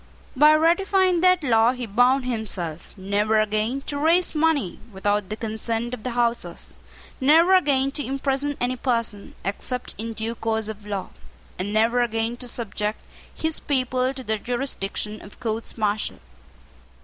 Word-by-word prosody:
By 300 +3 +7
ratifying 365 +2 +3
that 365 -2 +4
law 230 -2 +4
he 250 -1 -5
bound 245 +5 +3
himself 190 -9 -4
never 205 +3 +1
again 215 +5 0
to 285 +1 -4
raise 335 +4 +3
money 305 - +1
without 205 0 -1
the 215 - -3
consent 225 +2 -3
of 250 - -5
the 255 - -3
Houses, 235 -1 -1 0.4
never 325 +7 +5
again 275 -7 +3
to 290 +1 -3
imprison 275 +1 -1
any 250 +1 0
person, 230 -5 -2
except 250 +5 -3
in 225 +1 -4
due 225 +1 -2
course 220 -1 -2
of 210 -1 -8
law, 200 -2 -3 0.5
and 195 +3 -2
never 225 +3 +3
again 225 0 -1
to 250 - -6
subject 215 -2 -3 0.3
his 320 -1 -2
people 255 -2 0
to 260 - -5
the 220 -2 -1
jurisdiction 215 -4 -3
of 205 - -13
courts 225 0 -4
martial. 210 -1 -1
235 Hz, 150 wpm, -24 LUFS, 215-275 Hz, 0.5 s, By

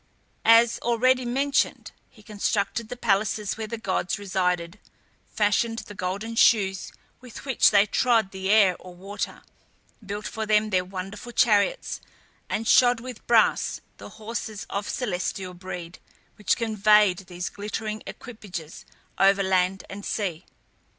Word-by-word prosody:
As 230 0 +6
already 250 +2 +2
mentioned, 275 +4 0 0.2
he 215 - -20
constructed 210 +1 -2
the 250 - -6
palaces 210 -2 0
where 220 0 -5
the 230 - -5
gods 190 -3 -2
resided, 180 -2 -1 0.5
fashioned 225 +2 +1
the 210 - -8
golden 200 +4 -4
shoes 195 -4 +3 0.3
with 250 +1 -11
which 265 -3 +4
they 200 -1 +5
trod 225 -2 +2
the 190 0 -4
air 200 -4 +5
or 180 -1 -12
water, 195 +3 -6 0.6
built 205 +1 -6
for 220 -2 -4
them 215 0 +2
their 185 -2 +2
wonderful 195 +5 -7
chariots, 235 - +2 0.5
and 225 +1 -2
shod 245 -1 +5
with 250 -1 -10
brass 230 -2 +3 0.2
the - - -10
horses 220 -1 -5
of 200 +1 -3
celestial 185 -4 -3
breed, 180 -1 -8 0.4
which 210 - 0
conveyed 210 -4 +3
these 180 0 -5
glittering 215 +1 -5
equipages 185 -9 -9 0.3
over 195 0 +4
land 190 0 +1
and 200 +1 -8
sea. 185 -7 -3
210 Hz, 135 wpm, -25 LUFS, 190-230 Hz, 0.6 s, As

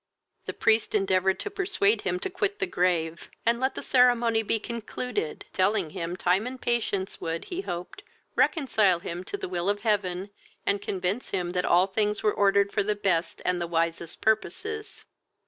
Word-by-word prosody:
The - - -2
priest 220 0 +2
endeavoured 190 -1 +2
to 410 - -4
persuade 400 +2 +2
him 365 - -1
to 385 - -1
quit 400 +2 -1
the 395 - 0
grave, 170 - 0 0.2
and 235 +1 +3
let 260 +1 0
the - - -5
ceremony 240 -3 +4
be 220 +1 0
concluded, 235 -5 -4
telling 190 -3 +1
him, 175 -2 -4
time 185 +6 +2
and 260 +1 -6
patience 220 -6 -1
would, 165 0 -3
he 365 +1 -4
hoped, 180 - -6 0.3
reconcile 220 - +3
him 170 +1 -6
to 405 - -4
the - - -5
will 180 +1 -1
of 205 0 0
heaven, 200 -3 0 0.3
and 200 0 +1
convince 190 +4 -2
him 180 -3 -2
that 180 0 0
all 180 +2 +5
things 210 +1 -1
were 210 - +3
ordered 200 0 +3
for - - +1
the 210 +1 0
best 185 -4 -1
and 180 -1 +1
the 170 - -1
wisest 165 0 -2
purposes. 420 - -1
200 Hz, 180 wpm, -27 LUFS, 180-235 Hz, 0.3 s, all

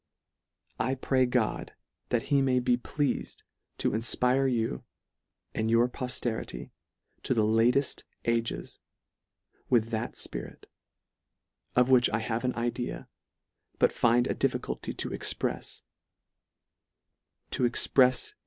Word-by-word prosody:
I 130 - 0
pray 130 -1 +2
God, 125 -3 -1 0.4
that 120 -2 +1
he 140 - +5
may 130 -1 +2
be 125 0 +2
pleafed 140 +3 -2 0.3
to - - 0
infpire 125 +4 +2
you 110 - -1 0.7
and 110 0 -1
your 115 +1 +4
pofterity 120 - -4 0.5
to 130 - 0
the 110 - +3
latefi: 115 +5 +2 0.2
ages 115 0 -1 0.9
with 115 -2 +3
that 110 0 -3
fpirit, - - -6 1.1
of 125 +1 +4
which 125 -2 +6
I 115 - 0
have 110 +1 -2
an 125 0 0
idea, 120 +1 -3 0.7
but - - +4
find 120 +1 +3
a - - 0
difficulty - - -2
to - - -3
exprefs: - - -2 1.7
to - - 0
exprefs 125 +2 +1
in 125 -1 +9
LETTER 130 - -2
III. 420 - -22
120 Hz, 125 wpm, -29 LUFS, 115-130 Hz, 1.7 s, in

